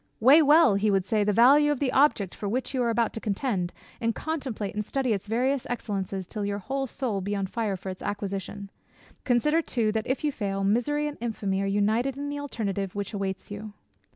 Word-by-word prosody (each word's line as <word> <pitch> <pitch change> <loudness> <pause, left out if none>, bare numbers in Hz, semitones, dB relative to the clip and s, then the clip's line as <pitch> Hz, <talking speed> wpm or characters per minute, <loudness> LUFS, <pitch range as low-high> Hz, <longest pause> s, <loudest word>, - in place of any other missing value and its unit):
"Weigh 270 +8 +7
well 300 -4 +6
(he 200 +2 +2
would 195 -2 +2
say) 210 +1 +1
the 210 - +2
value 275 +7 +6
of 290 - -1
the 275 -3 +1
object 265 -10 +3
for 205 - -4
which 255 +5 -2
you 260 - 0
are 235 - +1
about 230 0 +1
to - - -4
contend, 200 -4 -1 0.3
and 230 -1 0
contemplate 265 -10 -3
and 210 - -2
study 255 +2 0
its 200 0 -4
various 255 +4 0
excellences, 195 -5 -3
till 210 +3 -5
your 200 0 -1
whole 270 +7 -3
soul 230 -6 -2
be 200 +2 -2
on 195 -1 -1
fire 205 0 -2
for 190 - -7
its 185 - -7
acquisition. 200 0 -4 0.5
Consider 300 +6 +3
too, 230 -8 0
that, 220 0 -2
if 260 +3 -1
you 300 - +1
fail, 195 -5 -2
misery 245 +9 +1
and 295 - -7
infamy 200 -4 -1
are 195 - -1
united 220 +7 +1
in 285 +1 -4
the 290 0 -4
alternative 200 -9 -3
which 200 +1 -4
awaits 195 -1 -4
you. 205 +1 -7
220 Hz, 215 wpm, -27 LUFS, 200-265 Hz, 0.5 s, Weigh